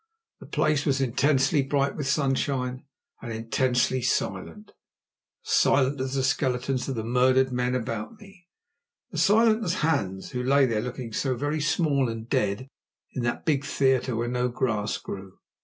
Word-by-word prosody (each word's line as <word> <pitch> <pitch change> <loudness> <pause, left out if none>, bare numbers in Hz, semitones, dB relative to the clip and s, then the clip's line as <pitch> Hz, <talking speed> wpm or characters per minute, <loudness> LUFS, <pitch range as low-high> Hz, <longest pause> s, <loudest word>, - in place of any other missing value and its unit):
The - - -12
place 150 -1 +1
was 140 -3 +1
intensely 135 +3 +2
bright 140 +1 0
with 145 -3 -3
sunshine 135 -2 -1 0.4
and 120 - -6
intensely 125 +3 0
silent; 125 - -2 0.7
as - - -5
silent 135 0 +3
as 130 +1 -3
the 135 - 0
skeletons 130 -1 0
of 135 - -2
the 110 - -3
murdered 130 +2 +3
men 125 0 0
about 115 - -4
me; 195 -3 -17 0.7
as - - 0
silent 220 +1 +4
as 180 -2 -1
Hans, 100 -12 -1
who 125 - -3
lay 135 +2 +4
there 115 -4 0
looking 125 -2 -6
so 130 +1 0
very 145 +4 -2
small 140 -4 +1
and 115 0 -6
dead 105 +3 -1 0.5
in 130 - -3
that 120 0 -2
big 145 -3 +1
theatre 130 -3 +1
where 120 +1 -1
no 125 +1 0
grass 110 -4 -1
grew. 95 -1 -8
130 Hz, 160 wpm, -26 LUFS, 120-140 Hz, 0.7 s, silent